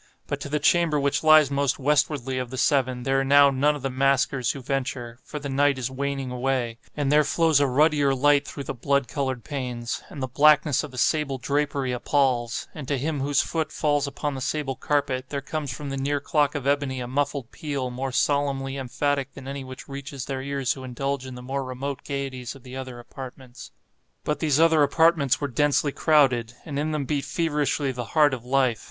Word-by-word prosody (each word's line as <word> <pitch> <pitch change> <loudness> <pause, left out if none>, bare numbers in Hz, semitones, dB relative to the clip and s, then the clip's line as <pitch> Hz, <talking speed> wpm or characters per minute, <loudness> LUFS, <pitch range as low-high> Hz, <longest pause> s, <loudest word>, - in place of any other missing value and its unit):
But - - -4
to - - -5
the 150 - 0
chamber 155 0 +3
which 140 +2 0
lies 155 -2 +6
most 140 -2 +1
westwardly 135 -2 +1
of 125 -1 -4
the 130 - -6
seven, 130 -3 +1
there 135 +1 +2
are - - 0
now 140 +1 +6
none 145 +3 +2
of 145 - -8
the 135 - -1
maskers 135 -1 +1
who 140 - -7
venture; 130 -2 -3
for 150 - -7
the 145 -1 -5
night 140 0 +2
is 130 0 -3
waning 135 -1 -3
away; 125 -2 -1 0.2
and 145 -2 0
there 150 +1 +5
flows 160 -1 +3
a 140 - +3
ruddier 145 +1 +3
light 145 +2 +3
through 140 - -6
the - - -4
blood 140 +1 0
colored 130 -2 -3
panes; 125 -5 -4
and 145 - -9
the - - -1
blackness 150 +1 +4
of - - -6
the 130 - -12
sable 140 +1 +1
drapery 140 0 -1
appals; 125 -2 0
and 150 -4 -8
to 140 - 0
him 150 +3 -2
whose 140 +1 +2
foot 160 -2 -2
falls 145 -2 +1
upon 145 +1 -3
the 130 - -5
sable 135 0 -2
carpet, 135 -3 -1
there 140 - -2
comes 145 0 -4
from 140 +3 -6
the 135 - -3
near 140 +2 0
clock 145 0 +1
of 140 -3 -3
ebony 140 -2 0
a 125 - -4
muffled 140 -1 -2
peal 140 -5 -4
more 130 +2 -3
solemnly 140 0 0
emphatic 140 +1 -1
than 135 -1 -9
any 140 0 -5
which 130 0 -10
reaches 140 -1 -6
their 135 -1 -4
ears 135 -1 -1
who 130 - -10
indulge 130 +1 -3
in 130 - -8
the 125 - -9
more 135 +2 -3
remote 130 +1 -5
gaieties 135 -3 -4
of 135 - -15
the 125 0 -9
other 130 -2 -6
apartments. 125 +1 -10 0.5
But 150 - -1
these 150 -3 +2
other 160 -1 +5
apartments 150 -2 +3
were 145 - -1
densely 145 +2 +1
crowded, 130 -7 +3
and 145 -3 -3
in 150 +1 -1
them 150 -2 -2
beat 145 0 -1
feverishly 150 -4 0
the 125 -1 -4
heart 150 -2 +6
of 120 -3 -4
life. 130 -3 +1
140 Hz, 210 wpm, -25 LUFS, 130-145 Hz, 0.5 s, lies